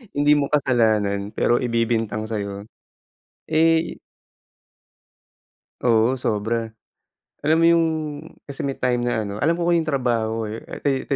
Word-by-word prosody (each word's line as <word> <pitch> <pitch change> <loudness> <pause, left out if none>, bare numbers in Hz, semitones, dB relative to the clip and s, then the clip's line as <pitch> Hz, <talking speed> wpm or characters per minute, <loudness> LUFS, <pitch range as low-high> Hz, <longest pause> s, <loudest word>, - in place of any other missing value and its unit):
Hindi 145 +1 +3
mo 140 - +1
kasalanan 110 -7 +1
pero 120 - +2
ibibintang 115 -2 -1
sa'yo. 100 -1 -4 0.8
Eh 165 +1 +2 1.8
Oo, 120 +2 +3
sobra. 110 0 -2 0.7
Alam 155 +2 +2
mo - - +6
yung 165 -1 +4 0.6
kasi 140 0 -5
may 135 - -3
time 125 -1 0
na 120 -3 -1
ano 100 - -5
alam 165 +3 +2
ko 170 - -1
yung 165 -2 +1
trabaho 115 -5 0
eh 110 +2 -5 0.2
eto 140 0 0
120 Hz, 125 wpm, -22 LUFS, 110-145 Hz, 1.8 s, mo